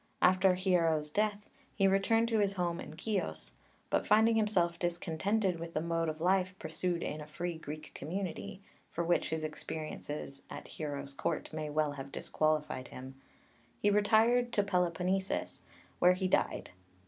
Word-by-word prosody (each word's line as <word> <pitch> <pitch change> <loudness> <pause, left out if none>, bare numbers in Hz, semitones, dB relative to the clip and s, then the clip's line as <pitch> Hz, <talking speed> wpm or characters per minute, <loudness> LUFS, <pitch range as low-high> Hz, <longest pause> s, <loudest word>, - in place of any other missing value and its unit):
After 185 0 +5
Hiero's 165 -5 +2
death 210 +2 -1 0.2
he 195 -2 +4
returned 210 +4 +3
to 225 -2 +2
his 200 -1 +2
home 175 -3 -1
in 155 - -8
Keos; 155 - -3 0.4
but - - +2
finding 220 +2 +5
himself 190 -6 +2
discontented 175 +2 0
with 170 0 -7
the - - +2
mode 165 0 0
of 155 0 -5
life 185 +2 +2
pursued 170 +2 -2
in 150 - -3
a 150 - -8
free 175 +3 -3
Greek 155 0 -7
community, 185 +4 -5 0.3
for 170 - -2
which 175 +1 +2
his 160 0 -2
experiences 150 -2 -5
at - - -8
Hiero's 140 -2 -5
Court 140 - -2
may 155 -1 -3
well 150 0 +1
have 140 -1 -7
disqualified 150 -5 -1
him, 130 +1 -9 0.7
he 205 - +3
retired 225 +4 +4
to 205 - +3
Peloponnesus, 185 0 0 0.4
where 180 +1 +6
he 185 +1 -1
died. - - 0
175 Hz, 155 wpm, -33 LUFS, 155-195 Hz, 0.7 s, where